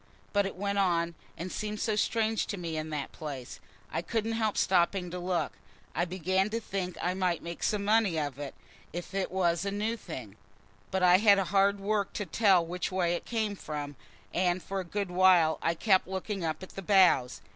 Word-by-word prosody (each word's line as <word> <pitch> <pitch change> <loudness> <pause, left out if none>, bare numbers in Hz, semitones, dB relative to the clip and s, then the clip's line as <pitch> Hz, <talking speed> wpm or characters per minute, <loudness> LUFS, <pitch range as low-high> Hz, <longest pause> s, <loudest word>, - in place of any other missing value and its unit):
But 200 -1 +3
it - - -7
went 200 +1 -1
on, 170 -3 +2 0.2
and 180 +2 -5
seemed 210 0 -4
so 220 -2 0
strange 220 +1 +1
to 205 - -3
me 170 -3 -4
in 155 0 -3
that 150 -2 -4
place, 140 -5 -7 0.3
I - - 0
couldn't 225 +5 -1
help 220 -2 0
stopping 180 0 +2
to 180 - -4
look. 180 -1 -1 0.4
I 175 - +1
began 185 +2 0
to 225 +2 -1
think 190 -5 -4
I 180 - +1
might 185 -3 0
make 170 0 -6
some 205 -1 0
money 210 -5 +3
of 145 -3 -3
it, 145 -2 -6 0.4
if 175 +3 -6
it 195 -1 -1
was 175 -2 +1
a 200 - -1
new 210 +3 -1
thing. 125 - -8 0.5
But 190 -1 -1
I 180 0 +7
had 205 -1 +6
hard 195 +1 +2
work 200 0 -1
to 205 - -3
tell 190 -1 +4
which 180 +3 -3
way 180 -2 +1
it 175 - -4
came 220 -3 -1
from, 145 -5 -5 0.4
and 180 0 +1
for 195 0 -3
a - - -2
good 195 +1 -3
while 180 -3 +5
I 165 - +1
kept 190 +1 +3
looking 190 0 -3
up 160 +2 -2
at 185 - -8
the 195 - -7
boughs. 180 -10 +4
185 Hz, 205 wpm, -30 LUFS, 170-200 Hz, 0.5 s, I